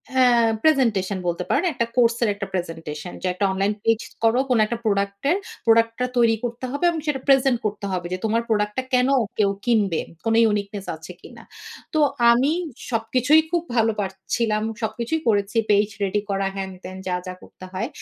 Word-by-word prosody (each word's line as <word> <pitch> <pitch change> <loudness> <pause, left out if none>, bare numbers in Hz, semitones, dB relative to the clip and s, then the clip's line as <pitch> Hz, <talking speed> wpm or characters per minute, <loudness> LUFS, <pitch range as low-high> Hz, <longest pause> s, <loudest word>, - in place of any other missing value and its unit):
হ্যাঁ, 240 -3 +5
প্রেজেন্টেশন 220 -11 +2
বলতে 175 +1 -1
পারেন। 345 - +2
একটা 235 -2 0
কোর্স 235 -1 +4
এর 220 - +2
একটা 200 -1 -5
প্রেজেন্টেশন। 165 -2 -5
যে 185 - -2
একটা 200 +2 0
অনলাইন 195 +2 0
পেজ 225 -1 +3 0.2
করো, 225 +3 +4
কোন 250 - +3
একটা 235 +2 -3
প্রোডাক্ট 200 -1 0
এর। 370 - +3 0.3
প্রোডাক্টটা 230 +1 +3
তৈরি 230 -1 +4
করতে 240 +1 -4
হবে 285 +4 -4
এবং 330 -2 -2
সেটা 285 -3 0
প্রেজেন্ট 270 -2 +4
করতে 205 -1 -3
হবে 180 -1 -2
যে - - -1
তোমার 225 +2 +1
প্রোডাক্টটা 210 +3 0
কেন 250 0 +4 0.3
কেউ 200 -2 +3
কিনবে? 210 -8 +2 0.3
কোন 225 0 +2 0.2
uniqueness 200 -1 -3
আছে 160 +3 -11
কিনা। - - -13 0.5
তো 310 - +2 0.3
আমি 260 +5 +3 0.4
সবকিছুই 255 +7 +3
খুব 345 -1 +1
ভালো 225 -1 +3
পারছিলাম। 210 +3 -2 0.2
সবকিছুই 235 +8 -2
করেছি। 205 0 +1
পেজ 205 0 +4 0.2
রেডি 200 +1 0
করা 195 0 0
হ্যান-ত্যান 185 -1 -7
যা, 180 - 0
যা 185 - -4
করতে 185 - -13
হয়। 215 +6 -2
220 Hz, 175 wpm, -23 LUFS, 195-240 Hz, 0.5 s, হ্যাঁ